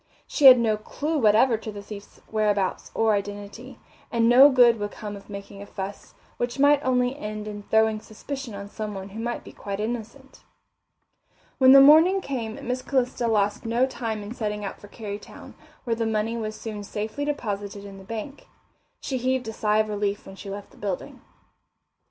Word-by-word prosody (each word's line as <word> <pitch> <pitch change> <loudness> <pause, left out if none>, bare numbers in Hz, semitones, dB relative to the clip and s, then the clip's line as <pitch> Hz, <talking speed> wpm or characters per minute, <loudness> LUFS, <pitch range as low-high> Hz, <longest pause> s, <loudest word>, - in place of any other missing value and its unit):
She 290 - 0
had 255 -1 +11
no 225 -3 +1
clue 300 +8 -3
whatever 225 +1 +4
to 215 0 -7
the 205 -1 -9
thief's 200 -1 -11
whereabouts 210 -3 0
or 225 -1 +3
identity, 205 +5 -5 0.3
and 230 -1 +2
no 260 +4 +8
good 245 -4 +5
would 205 0 -2
come 205 0 -7
of 200 +1 -13
making 200 0 -9
a 200 - -9
fuss, 195 +1 -7 0.2
which 240 +1 -2
might 285 +1 +4
only 250 0 +1
end 215 -4 -6
in 205 -1 -6
throwing 220 +1 +2
suspicion 245 +2 -7
on 200 0 -7
someone 205 -2 -6
who 210 +3 -8
might 240 +1 -3
be - - -11
quite 200 0 -6
innocent. 235 +4 -6 1.2
When 260 -1 +7
the 275 - +10
morning 320 +7 +7
came 240 -10 -4
Miss 250 +1 -1
Calista 250 -3 0
lost 205 -2 +1
no 235 +3 +2
time 225 -5 -4
in 205 +3 -7
setting 210 -3 -3
out 195 - -6
for 205 - -11
Kerrytown, 205 -1 -9 0.3
where 235 -3 -1
the 225 0 -1
money 220 +1 -1
was 215 -2 -4
soon 215 -2 -6
safely 215 +7 -4
deposited 205 -8 -4
in 195 -1 -10
the - - -12
bank. 230 +7 -7 0.5
She 260 -2 -3
heaved 255 -1 0
a - - -6
sigh 210 0 +1
of 215 0 +2
relief 205 -1 -2
when 195 - -10
she 195 +1 -9
left 200 +1 -7
the - - -20
building. 195 -3 -5
220 Hz, 185 wpm, -25 LUFS, 205-250 Hz, 1.2 s, had